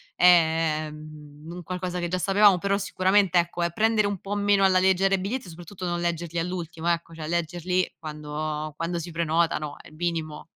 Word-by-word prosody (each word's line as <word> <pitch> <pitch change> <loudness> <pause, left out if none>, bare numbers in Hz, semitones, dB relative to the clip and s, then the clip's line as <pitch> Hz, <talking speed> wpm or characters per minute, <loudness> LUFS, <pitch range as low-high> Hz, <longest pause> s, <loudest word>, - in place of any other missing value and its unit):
è 160 -3 +4
mhmm, 150 0 -12
un 175 +1 -8
qualcosa 180 +1 -4
che 175 - -2
già 180 +2 -1
sapevamo, 200 +1 +5
però 200 +2 0
sicuramente, 190 -1 +2
ecco, 175 0 0
è 170 - 0
prendere 220 +1 +2
un 200 -2 -3
po' 200 - -5
meno 205 -1 +3
alla 190 -1 +5
leggera 190 +1 +3
i - - -3
biglietti 205 +4 -4
e - - -9
soprattutto 175 +3 -9
non 175 -1 -1
leggerli 170 -1 -2
all'ultimo 170 -1 -4
ecco, 170 -1 -1
cioè 160 -1 -7
leggerli 175 +2 -1
quando 150 0 -5
quando 170 +1 -2
si 170 +1 -7
prenotano, 165 -2 0
è - - -15
il 155 - -17
minimo. 160 -2 -3
175 Hz, 190 wpm, -25 LUFS, 160-185 Hz, -, sapevamo